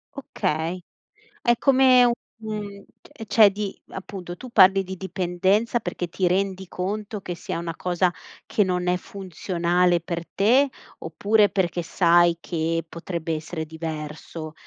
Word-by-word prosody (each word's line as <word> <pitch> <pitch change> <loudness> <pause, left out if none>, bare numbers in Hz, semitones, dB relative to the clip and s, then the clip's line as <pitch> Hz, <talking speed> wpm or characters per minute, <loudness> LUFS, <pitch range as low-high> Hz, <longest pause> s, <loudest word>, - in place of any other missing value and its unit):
Okay. 180 - -2 0.6
È 240 -1 +3
come 260 -2 +5
u 240 - +4 0.3
un 210 -2 -6 0.2
t 225 - -11
cioè 210 0 +6
di 200 0 -5
appunto 185 -2 -8
tu 255 - -9
parli 195 -2 +6
di 190 +1 -6
dipendenza 190 +5 0
perché 175 -1 -4
ti 180 +2 -2
rendi 190 0 -1
conto 210 +3 -4
che 175 -2 -5
sia - - -5
una 165 -1 -4
cosa 180 0 0 0.3
che 210 - +2
non 180 -1 -1
è 180 - +3
funzionale 180 -2 0
per 170 0 -5
te 250 +11 +3 0.3
oppure 205 +6 +2
perché 175 -2 -1
sai 170 0 +4
che 165 -1 -2
potrebbe 170 -1 -4
essere 160 +1 -5
diverso, 155 0 -7
180 Hz, 140 wpm, -24 LUFS, 170-200 Hz, 0.6 s, cioè